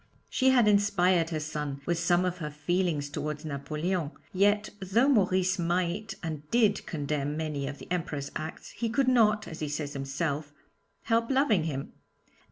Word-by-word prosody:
She 260 0 +3
had 245 -4 +5
inspired 190 -5 +3
her 160 -2 -2
son 150 -2 -4
with 170 -1 0
some 175 +1 +3
of 180 0 -2
her 150 -3 -3
feelings 155 0 0
towards 150 +1 -4
Napoleon; 155 +3 -2 0.2
yet, 205 +2 +2
though 200 +7 +2
Maurice 190 -6 +3
might 180 +4 -1
and 155 -3 -3
did 215 -4 +2
condemn 145 -2 -2
many 150 -3 -2
of 145 +1 -5
the - - -13
Emperor's 150 -5 -2
acts, 155 +1 -6
he 230 - -2
could 255 +4 +1
not, 215 -4 +4
as 160 - -8
he 155 - -2
says 145 0 -3
himself, 140 +2 -3 0.5
help 230 0 +1
loving 265 - +3
him. 140 -4 -4
170 Hz, 165 wpm, -29 LUFS, 150-205 Hz, 0.5 s, had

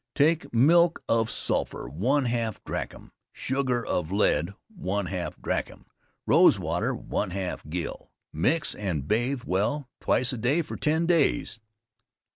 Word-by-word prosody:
Take 160 +3 +2
milk 165 +8 +4
of 115 -1 +2
sulphur - - -1
1/2 115 - 0
drachm, - - -5 0.2
sugar 125 -3 -1
of 85 -1 -2
lead 95 -2 +1 0.2
1/2 95 - -3
drachm, - - -3 0.4
rose - - +6
water - - -1
1/2 90 -4 -3
gill, 85 +1 -5 0.2
mix 150 - +1
and 85 -9 -3
bathe 120 +4 0
well 115 +10 -1
twice 125 +1 +1
a 125 - -4
day 140 +9 +2
for 155 - -7
ten 160 +2 +1
days. 150 -7 +1
120 Hz, 120 wpm, -27 LUFS, 95-145 Hz, 0.4 s, rose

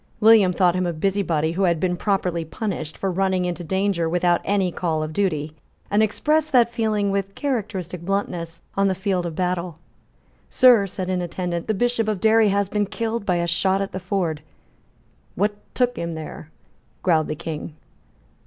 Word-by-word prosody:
William 215 -4 +6
thought 180 -1 +3
him 185 -1 0
a 170 - -1
busybody 165 -3 0
who 180 +4 -2
had 170 -2 +2
been 180 0 0
properly 180 -3 -1
punished 160 -2 -4
for 195 - -1
running 185 0 +1
into 175 0 -3
danger 190 -1 0
without 175 0 +2
any 195 -3 +1
call 160 -3 -1
of 155 0 -5
duty, 155 -5 -1 0.4
and 205 +1 +3
expressed 305 +8 +1
that 240 -3 +4
feeling, 215 -4 0
with 195 0 -2
characteristic 200 - -3
bluntness, 170 -3 -3
on 195 0 +3
the 190 - +1
field 185 -2 -1
of 165 - -6
battle. 180 -2 -2 0.7
"Sir," 245 -6 +6
said 185 0 -4
an 180 -1 0
attendant, 175 -1 -3
"the 215 - 0
Bishop 240 0 0
of 210 -3 -1
Derry 220 +1 +4
has 200 0 +1
been 205 +1 -1
killed 225 0 -3
by 180 - +2
a 170 0 0
shot 190 +3 +1
at 195 0 -3
the 185 - -4
ford." 180 -5 -2 0.9
"What 205 +2 +1 0.2
took 245 -1 +1
him 170 -1 -3
there?" 155 0 -8 0.5
growled 160 -4 +3
the - - -3
King. 155 0 -6
185 Hz, 180 wpm, -23 LUFS, 170-205 Hz, 0.9 s, William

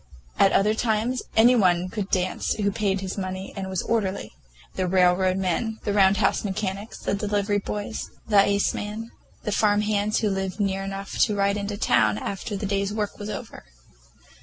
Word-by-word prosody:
At 195 - +6
other 210 +2 +3
times 225 +2 0 0.2
any 240 +3 +7
one 180 -5 +3
could 200 +1 -4
dance 185 0 0
who 200 -1 0
paid 195 -1 0
his 190 +1 -4
money 185 0 -5
and 190 -1 -4
was 190 -2 -2
orderly; 195 - -1 0.4
the 185 -1 -1
railroad 185 0 +3
men, 195 +4 -1
the 205 - -1
Round 195 -1 +5
House - - +2
mechanics, 200 +1 -3
the - - -2
delivery 205 0 0
boys, 205 +2 -5 0.2
the 210 -2 +5
iceman, 205 +2 0 0.3
the 210 - -2
farmhands 210 0 +2
who 215 - +1
lived 195 0 -3
near 195 -1 0
enough 195 0 -5
to 210 - +3
ride 200 0 +2
into 205 0 -3
town 110 - +3
after 200 - -4
their 205 - -3
day's 200 0 0
work 210 -1 -3
was 205 0 -5
over. - - -7
200 Hz, 175 wpm, -25 LUFS, 190-210 Hz, 0.4 s, any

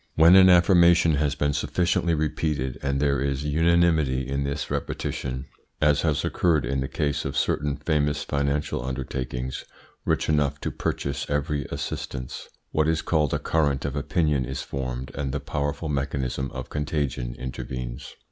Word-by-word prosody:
When 85 +3 +7
an 95 -1 +8
affirmation 85 -2 +6
has 75 -1 +1
been 70 0 0
sufficiently 85 +3 +1
repeated 75 -4 -1
and 70 0 0
there 70 -3 +2
is 70 0 -1
unanimity 80 -4 +2
in 70 +1 -1
this 70 +2 -3
repetition 65 0 -3 0.3
as 75 -2 +3
has 75 -3 +1
occurred 80 -6 +2
in 70 - -1
the 65 - -1
case 70 0 -1
of - - -3
certain 70 -1 0
famous 75 -1 0
financial 70 -2 -1
undertakings 65 0 -4 0.4
rich - - 0
enough 75 -2 +1
to - - -2
purchase 70 - -3
every 75 -1 -1
assistance 65 -1 -5 0.2
what 80 0 +2
is 80 0 +1
called 75 -4 +1
a - - +1
current 70 -4 0
of 70 0 -2
opinion 75 -1 +1
is - - -4
formed 65 -1 -4
and 70 -2 -3
the 70 - -1
powerful 75 +3 -3
mechanism 70 -2 -2
of 65 -1 -7
contagion 70 -5 -2
intervenes. 65 0 -6
70 Hz, 155 wpm, -25 LUFS, 65-75 Hz, 0.4 s, an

